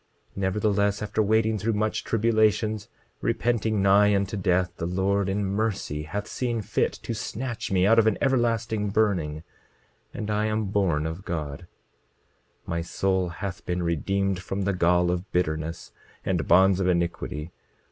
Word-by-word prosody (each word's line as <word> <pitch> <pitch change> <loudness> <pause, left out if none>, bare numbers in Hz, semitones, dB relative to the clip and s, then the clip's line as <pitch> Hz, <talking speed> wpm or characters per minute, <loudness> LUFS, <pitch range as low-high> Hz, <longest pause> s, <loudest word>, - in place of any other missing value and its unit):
27:28 - - -21
Nevertheless, 100 +1 +1
after 105 +1 0
wading 110 +1 +2
through 110 +4 0
much 110 +1 -1
tribulations, 110 -1 +1 0.3
repenting 110 -3 0
nigh 100 +1 +5
unto 100 +1 -1
death, 90 -2 +1
the 85 - -3
Lord 95 +2 0
in 100 +1 0
mercy 100 -7 -1
hath 100 +6 -4
seen 120 -1 -2
fit - - 0
to - - -3
snatch 120 -2 -4
me 95 -1 +3
out 115 +3 +6
of 110 - +4
an 110 - +2
everlasting 115 -5 +1
burning, 90 -8 0 0.7
and 105 0 -4
I 105 +1 +1
am 110 0 0
born 90 -7 +1
of 80 +4 -5
God. 80 -1 -5 1.0
27:29 - - -32
My 85 0 -1
soul 95 +1 0
hath 95 +2 -6
been 90 0 -2
redeemed 95 +3 0
from 95 +2 -3
the 100 +1 +1
gall 90 0 +3
of 90 +2 -4
bitterness 80 -1 -2 0.3
and - - 0
bonds 95 +2 +5
of 95 - +1
iniquity. 85 -2 -1
100 Hz, 155 wpm, -26 LUFS, 90-110 Hz, 1.0 s, out